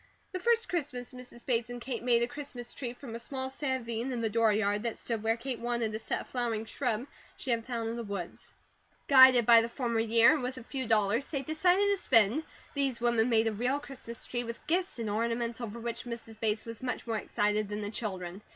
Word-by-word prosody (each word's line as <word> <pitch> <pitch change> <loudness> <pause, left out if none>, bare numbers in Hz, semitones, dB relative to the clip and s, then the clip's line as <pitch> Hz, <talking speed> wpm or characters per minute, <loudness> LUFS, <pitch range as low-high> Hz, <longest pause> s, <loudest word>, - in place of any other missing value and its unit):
The 370 - -3
first 465 +3 +2
Christmas 270 -8 -3
Mrs. 250 -1 -11
Bates 240 -2 0
and 245 0 -6
Kate 240 -1 -4
made 235 -1 +3
a - - +1
Christmas 245 -3 -7
tree 250 -4 -4
from 245 -2 -9
a 230 - -5
small 260 +1 -4
savine 260 -3 -2
in 245 -2 -2
the 225 -1 0
dooryard 210 -2 +2
that 230 0 -3
stood 230 -3 -3
where 225 +1 +1
Kate 245 0 -4
wanted 235 -2 -1
to 215 - -4
set - - -2
a - - -10
flowering 230 -3 -2
shrub 240 0 -2 0.3
she 260 - -3
had 230 0 -1
found 230 -3 -2
in - - -4
the 235 - -4
woods. 200 -5 -6 0.6
Guided 260 -3 +8
by 230 0 +8
the 230 - -3
former 235 -2 -1
year, 230 +4 +6
and 310 - -1
with 255 +1 -3
a 255 - -8
few 260 0 -4
dollars 220 +3 +2
they 275 -3 -3
decided 355 +6 +3
to 405 0 +2
spend, 230 - +4 0.3
these 275 -4 0
women 235 -1 +2
made 225 -1 +4
a 225 - +1
real 245 +6 0
Christmas 255 -5 -8
tree, 240 -1 -3
with 230 0 -7
gifts 355 +2 0
and 230 -2 -3
ornaments, 230 +2 -1
over 235 0 -5
which 235 +1 -4
Mrs. 230 -2 -7
Bates 215 -1 0
was 230 -1 -6
much 250 -1 -3
more 225 -2 -1
excited 210 0 0
than 210 0 -3
the 205 0 -4
children. 190 -4 -5
235 Hz, 225 wpm, -30 LUFS, 225-260 Hz, 0.6 s, Guided